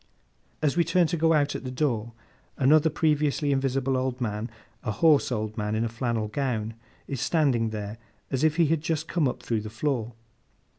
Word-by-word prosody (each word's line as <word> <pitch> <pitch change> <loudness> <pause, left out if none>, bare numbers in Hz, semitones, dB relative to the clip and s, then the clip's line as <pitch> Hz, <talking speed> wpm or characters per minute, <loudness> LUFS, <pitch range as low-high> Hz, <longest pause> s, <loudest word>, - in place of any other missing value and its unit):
As 150 -2 +2
we 170 - +4
turn 170 +2 +3
to 170 - -1
go 165 0 +3
out 145 -2 +2
at - - -5
the 130 - -4
door, 120 -4 -1 0.4
another 150 +4 +5
previously 150 -1 +1
invisible 135 -1 0
old 130 0 -1
man, 110 -1 -2 0.3
a - - -3
hoarse 145 +6 +4
old 110 -2 -2
man 105 +1 -1
in 110 +1 0
a - - -2
flannel 115 -1 -2
gown, 115 -2 -2 0.3
is 135 -3 -4
standing 130 -9 +2
there, 105 0 -5 0.3
as 135 +2 0
if 155 -1 +3
he 170 -1 +4
had 160 0 +1
just 160 0 -2
come 165 -5 +1
up 125 - -4
through 115 -2 -1
the 110 - -7
floor. 120 -1 -2
135 Hz, 195 wpm, -26 LUFS, 115-155 Hz, 0.4 s, another